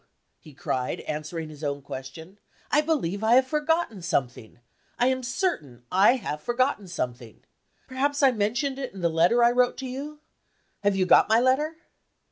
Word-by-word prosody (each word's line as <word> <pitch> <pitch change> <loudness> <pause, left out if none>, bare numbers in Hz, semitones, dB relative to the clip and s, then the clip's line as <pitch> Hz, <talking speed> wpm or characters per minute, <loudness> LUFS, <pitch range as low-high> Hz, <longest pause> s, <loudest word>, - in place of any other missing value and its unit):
he 155 - -15
cried, 125 -1 -3
answering 155 +2 -5
his 155 0 -12
own 140 -1 -2
question. 140 +8 -9 0.3
"I 300 - +4
believe 230 - -1
I 220 +2 +4
have 260 +1 +5
forgotten 300 - -1
something 130 -9 -3 0.4
I 245 - +2
am 260 0 -1
certain 240 - -3
I 195 +7 +5
have 150 - -5
forgotten 240 - 0
something. 125 - -6 0.4
Perhaps 280 +2 -1
I 270 - +7
mentioned 240 +5 -1
it 265 -6 -5
in 190 - -8
the 170 - +2
letter 175 +9 +3
I 235 - +5
wrote 245 0 +2
to 265 - -6
you. 280 +4 -6 0.7
Have 200 -1 +2
you 190 -1 +1
got 180 - +5
my 220 +1 +5
letter?" 270 +6 +1
215 Hz, 170 wpm, -26 LUFS, 160-260 Hz, 0.7 s, I